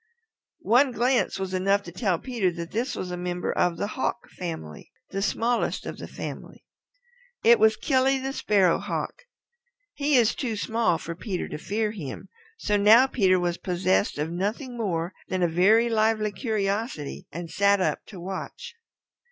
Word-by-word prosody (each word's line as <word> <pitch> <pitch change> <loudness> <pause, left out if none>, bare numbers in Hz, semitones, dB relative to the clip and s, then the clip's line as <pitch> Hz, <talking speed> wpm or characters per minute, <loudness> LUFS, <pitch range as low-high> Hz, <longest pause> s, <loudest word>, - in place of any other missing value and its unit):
One 250 +4 +5
glance 245 -2 +1
was 190 -1 -4
enough 195 +2 +2
to 175 - -9
tell 185 -1 0
Peter 230 -3 -1
that 170 0 -6
this 240 +5 -2
was 180 - -4
a 180 - -3
member 180 0 -2
of 175 -1 +1
the - - -1
Hawk 210 - -3
family, 160 - -7 0.2
the 195 - -2
smallest 230 +4 0
of - - -6
the - - -7
family. - - -8 0.8
It 235 +1 +6
was 220 0 +5
Killy 270 -1 +2
the 265 +1 -4
Sparrow 195 -9 +3
Hawk. - - -4 0.7
He 290 0 +1
is 235 -4 +4
too 235 -5 -3
small 225 -3 +1
for 170 +1 -6
Peter 185 +1 -4
to - - -6
fear 210 +5 -1
him, 165 -11 -7 0.3
so 210 - +1
now 220 +5 +7
Peter 190 -8 +2
was 175 -1 -1
possessed 185 0 0
of 150 +2 -2
nothing 215 +8 -3
more 180 -6 -2
than 185 -1 -1
a - - +4
very 200 +8 +4
lively 215 -1 +1
curiosity, 205 - -3
and 170 0 -7
sat 200 +3 +3
up 185 - 0
to 195 - -10
watch. 190 +2 -6
200 Hz, 170 wpm, -26 LUFS, 180-230 Hz, 0.8 s, now